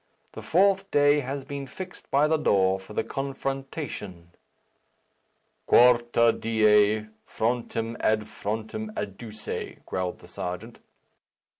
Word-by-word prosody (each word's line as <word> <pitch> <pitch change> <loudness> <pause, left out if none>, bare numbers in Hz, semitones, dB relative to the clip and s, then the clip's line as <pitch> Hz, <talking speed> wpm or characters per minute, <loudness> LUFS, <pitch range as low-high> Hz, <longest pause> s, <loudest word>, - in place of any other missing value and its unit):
The - - -8
fourth 195 +2 +3
day 145 0 +4
has 135 0 -4
been 140 -1 -6
fixed 180 +7 -9
by 145 +2 +4
the 160 0 +2
law 95 -8 +3
for 95 +2 -12
the - - 0
confrontation." 135 - -5 1.4
"Quarta 120 -1 +5
die, 110 -1 +3 0.2
frontem 115 0 -2
ad 110 0 +2
frontem 110 +1 -4
adduce," 105 +2 -6
growled 90 -1 -3
the - - -16
Serjeant. 90 +7 -6
115 Hz, 110 wpm, -26 LUFS, 105-140 Hz, 1.4 s, Quarta